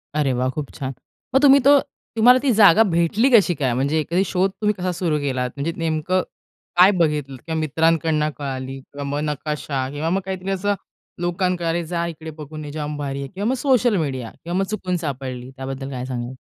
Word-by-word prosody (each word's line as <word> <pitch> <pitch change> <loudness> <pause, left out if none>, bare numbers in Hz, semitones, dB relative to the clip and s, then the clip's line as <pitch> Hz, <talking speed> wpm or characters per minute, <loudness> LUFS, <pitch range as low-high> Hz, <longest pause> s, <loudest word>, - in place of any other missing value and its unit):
अरे 140 -4 +1
वाह! 125 +1 0
खूप 145 +1 -5
छान! 135 -1 -5 0.4
मग 270 - +6
तुम्ही 280 -1 +7
तो 280 +2 +6 0.4
तुम्हाला 250 +3 +6
ती 265 - +3
जागा 205 +2 +8
भेटली 170 +10 +2
कशी 205 -7 +5
काय? 130 -5 0
म्हणजे 140 +5 +1
एखादी 175 +5 +1
शोध 190 +1 +1
तुम्ही 210 0 +2
कसा 180 0 -1
सुरु 165 -3 -1
केलात? 130 -3 -1
म्हणजे 155 +4 -1
नेमकं 165 +3 0 0.6
काय 190 +3 +8
बघितलत 150 -5 0
किंवा 160 -1 -1
मित्रांकडून 160 0 +1
कळाली 135 -1 -5
किंवा 140 +2 -9
मग 145 +1 -1
नकाशा 145 -2 -3
किंवा 150 +3 -3
मग 195 +2 +1
काहीतरी 190 0 -4
असं 200 +2 0 0.5
लोकांनाकडे 175 0 0
अरे 170 +1 0
जा 170 -1 -1
इकडे 160 -1 -7
बघून 155 +1 -7
निजाम 150 0 -5
भारी 140 -1 -3
आहे 140 - -5
किंवा 200 +6 -4
मग 260 - +1
सोशल 250 -4 +2
मीडिया 130 -7 -3
किंवा 175 +2 -2
मग - - +2
चुकून 185 -4 -2
सापडली 130 -3 -5
त्याबद्दल 135 +1 -5
काय 125 -1 -4
सांगाल? 125 0 -5
160 Hz, 195 wpm, -22 LUFS, 140-185 Hz, 0.6 s, जागा